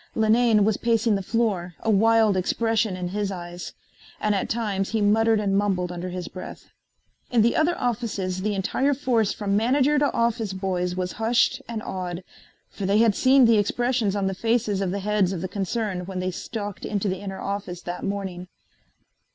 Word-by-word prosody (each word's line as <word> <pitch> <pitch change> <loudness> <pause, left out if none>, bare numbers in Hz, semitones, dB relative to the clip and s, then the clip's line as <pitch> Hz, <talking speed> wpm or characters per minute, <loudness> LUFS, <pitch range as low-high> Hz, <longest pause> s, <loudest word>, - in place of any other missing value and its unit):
Linane 220 -1 +4
was 215 -1 +1
pacing 230 -1 +2
the 195 - 0
floor, 190 -5 -1
a 225 - +1
wild 220 0 +4
expression 220 +1 0
in 180 -1 -3
his 205 +1 -2
eyes, 175 -1 -7 0.5
and 210 - +1
at 195 - -1
times 205 -4 -1
he 225 - 0
muttered 220 +2 +3
and 200 -2 0
mumbled 190 -3 0
under 175 +1 -5
his 180 -1 -5
breath. 185 - -9 0.6
In 235 -3 +3
the 235 - +2
other 330 +3 +2
offices 205 -6 -2
the 210 +1 -1
entire 265 +9 0
force 235 -6 +1
from 200 -2 -1
manager 270 +7 +3
to 290 -1 +2
office 230 -3 0
boys 180 -2 -2
was 180 -1 -2
hushed 240 +4 +2
and 225 -2 -4
awed, 180 -1 -5 0.5
for 195 - -4
they 200 +2 +3
had 225 -1 +4
seen 260 +3 +5
the 230 -2 +5
expressions 235 0 0
on 200 -1 0
the 195 - 0
faces 220 -1 0
of 195 - 0
the 200 +2 -3
heads 205 -2 +1
of 175 - -4
the 185 - -2
concern 195 -1 -3
when 190 -1 -5
they 185 0 -1
stalked 205 +1 -6
into 205 -1 -2
the 185 -1 -2
inner 195 -1 -6
office 195 -3 -4
that 175 0 -5
morning. 190 -3 -4
205 Hz, 190 wpm, -24 LUFS, 185-225 Hz, 0.6 s, seen